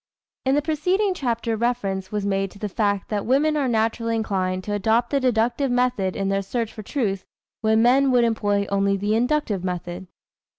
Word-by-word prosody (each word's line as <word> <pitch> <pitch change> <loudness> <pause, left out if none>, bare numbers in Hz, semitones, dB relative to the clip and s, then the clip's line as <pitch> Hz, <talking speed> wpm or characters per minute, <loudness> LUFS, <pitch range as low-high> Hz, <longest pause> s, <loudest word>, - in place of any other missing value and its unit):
" - - -62
In 265 - +4
the 295 - +1
preceding 360 +6 +1
chapter 235 -7 -1
reference 205 -5 -2
was 210 -1 -2
made 195 -1 0
to 200 - -15
the 210 - -3
fact 200 -1 -1
that 205 -2 -1
women 290 +5 +2
are 285 -3 +1
naturally 230 0 0
inclined 185 -4 -1
to 205 - -3
adopt 225 +4 +1
the 280 - +2
deductive 245 +2 +1
method 245 -7 0
in 195 0 -1
their 195 0 +1
search 225 +3 -3
for 215 - -8
truth 205 -4 -2 0.4
when 220 0 +3
men 265 +3 +4
would 250 -2 +4
employ 205 -3 +1
only 200 0 +2
the 205 +2 0
inductive 235 -5 0
method. 180 0 -4
220 Hz, 195 wpm, -23 LUFS, 195-250 Hz, 0.4 s, In